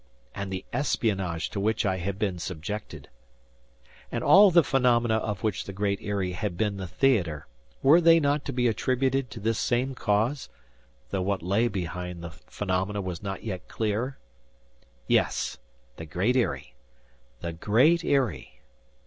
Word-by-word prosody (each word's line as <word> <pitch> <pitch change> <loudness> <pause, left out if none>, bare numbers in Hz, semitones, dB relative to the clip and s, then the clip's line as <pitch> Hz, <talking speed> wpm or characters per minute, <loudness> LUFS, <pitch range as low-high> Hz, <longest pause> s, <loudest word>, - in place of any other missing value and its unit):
And 100 -1 -5
the 95 0 -4
espionage 95 - -1
to 100 - -3
which 110 +2 0
I 95 -1 +1
had 95 +2 -3
been 100 -4 -1
subjected! 90 +5 -6 1.0
And - - -2
all 200 +1 +8
the 170 -2 +5
phenomena 120 -4 +2
of 105 -3 -3
which 110 -4 -1
the 100 - -7
Great 100 0 -1
Eyrie 100 -3 -2
had 90 0 -3
been 105 -1 0
the 95 -1 -5
theater, 90 - +1 0.4
were 150 +6 +7
they 165 0 +6
not 145 -1 +1
to - - -3
be 125 -1 +1
attributed 130 +3 0
to - - -8
this 115 +2 0
same 125 +2 0
cause—though 105 - -3
what 95 -1 -1
lay 100 +7 +2
behind 90 -3 -5
the 85 - -6
phenomena 95 +3 -3
was 90 -3 -4
not 95 -2 -5
yet 95 -5 -5
clear? 115 +5 -2 0.9
Yes, - - +1 0.4
the 80 - -8
Great 95 +11 0
Eyrie! 125 -3 -1 0.7
The 85 -1 -4
Great 125 - +3
Eyrie! 125 - -1
105 Hz, 150 wpm, -27 LUFS, 95-125 Hz, 1.0 s, all